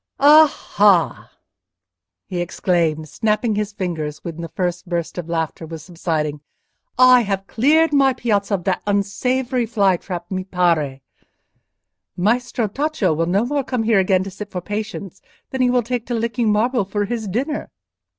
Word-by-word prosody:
"Aha!" 275 - +4 1.0
he 175 -1 -3
exclaimed, 170 -3 0
snapping 215 - 0
his 210 0 -2
fingers 160 -6 -4
when 170 -1 -6
the 165 - -6
first 180 +1 -3
burst 170 0 -3
of 170 -1 -7
laughter 165 -1 -2
was 160 -1 -8
subsiding. 155 -4 -3 0.6
"I 255 -1 +7
have 195 -3 -2
cleared 300 +9 +3
my 270 -2 +4
piazza 205 -5 0
of 180 - -5
that 185 0 0
unsavoury 245 +5 0
fly 200 -5 +2
trap, 175 0 -7
mi 185 0 -2
pare. 170 -7 0 1.2
Maestro 235 +4 0
Tacco 265 - 0
will 165 +2 0
no 195 +6 +1
more 285 +2 -1
come 250 -3 -2
here 220 -2 +3
again 185 -1 +2
to 195 - -7
sit 205 +2 -8
for 185 - -4
patients 205 -1 -6 0.3
than 265 - -2
he 250 - +4
will 245 -1 +2
take 245 0 -3
to 240 - -2
licking 230 0 0
marble 235 +2 +1
for 205 +2 -2
his 225 0 -4
dinner." 270 - -3
200 Hz, 160 wpm, -20 LUFS, 175-240 Hz, 1.2 s, I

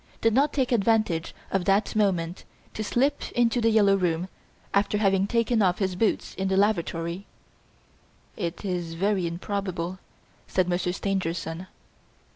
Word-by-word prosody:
did 225 -1 +2
not 280 +5 +3
take 260 -3 0
advantage 215 -7 +1 0.2
of 190 -2 0
that 200 +3 +2
moment 180 -5 0 0.3
to 215 - -3
slip 260 +7 0
into 240 0 +2
"The 230 - +4
Yellow 205 -3 +5
Room", 180 -1 0 0.4
after 200 +1 +2
having 195 -2 +2
taken 230 0 +1
off 180 -2 +3
his 190 -2 -1
boots 220 +4 0
in 190 - -2
the 190 0 +1
lavatory?" 175 -2 0 1.1
"It 175 +1 -4
is 175 -3 -3
very 190 0 +1
improbable," 185 0 -3 0.5
said 185 -1 +1
Monsieur 180 0 0
Stangerson. 180 -2 -3
195 Hz, 140 wpm, -26 LUFS, 175-215 Hz, 1.1 s, Yellow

